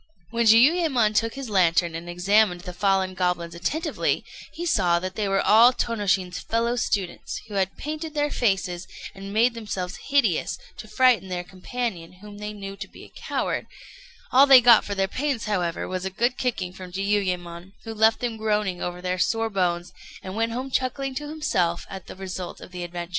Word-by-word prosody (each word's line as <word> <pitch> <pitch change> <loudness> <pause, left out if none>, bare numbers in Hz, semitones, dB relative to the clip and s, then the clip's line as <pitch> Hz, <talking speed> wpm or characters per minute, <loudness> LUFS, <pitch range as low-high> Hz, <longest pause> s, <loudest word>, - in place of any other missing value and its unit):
When 235 -1 +1
Jiuyémon 250 -1 +5
took 225 +3 +1
his 275 -2 -6
lantern 175 -4 +2
and 165 +1 -6
examined 180 +1 +2
the 180 - -7
fallen 190 0 +1
goblins 180 -2 -1
attentively, 290 - -1 0.3
he 345 - -6
saw 180 - +3
that 185 +2 -4
they 210 0 -2
were 195 0 +1
all 230 +4 +7
Tônoshin's 200 -7 -1
fellow 230 +1 0
students, 200 -6 -2
who 210 - -10
had 195 -1 -1
painted 310 +1 -5
their 295 0 0
faces, 190 -5 -1 0.3
and 195 +1 -8
made 230 +4 +3
themselves 200 -5 -5
hideous, 265 - +2 0.2
to - - -9
frighten 250 -3 +3
their 180 -1 -3
companion, 185 -1 -5
whom 205 +2 -12
they 210 0 -5
knew 195 -1 -7
to 200 0 -7
be - - -14
a - - -16
coward: - - -2 0.6
all 270 +3 +7
they 270 -2 +10
got 235 -2 +7
for 200 - -4
their 195 0 +1
pains, 260 +2 -2
however, 180 -5 -1
was 185 0 -4
a 190 - -2
good 240 +6 0
kicking 195 -9 -2
from 185 -1 -10
Jiuyémon, 185 -2 -2
who 225 - -6
left 220 +1 +3
them 235 -2 -2
groaning 210 -4 -1
over 180 0 -4
their 185 0 -1
sore 225 +3 +1
bones, 175 -3 -1 0.3
and 190 +1 -6
went 225 +1 0
home 255 +3 -4
chuckling 265 +1 -1
to 295 +2 -5
himself 185 - -1
at 190 -2 -8
the - - -9
result 185 -1 -6
of - - -12
the 180 -1 -6
adventure. 175 0 -6
200 Hz, 190 wpm, -24 LUFS, 180-235 Hz, 0.6 s, they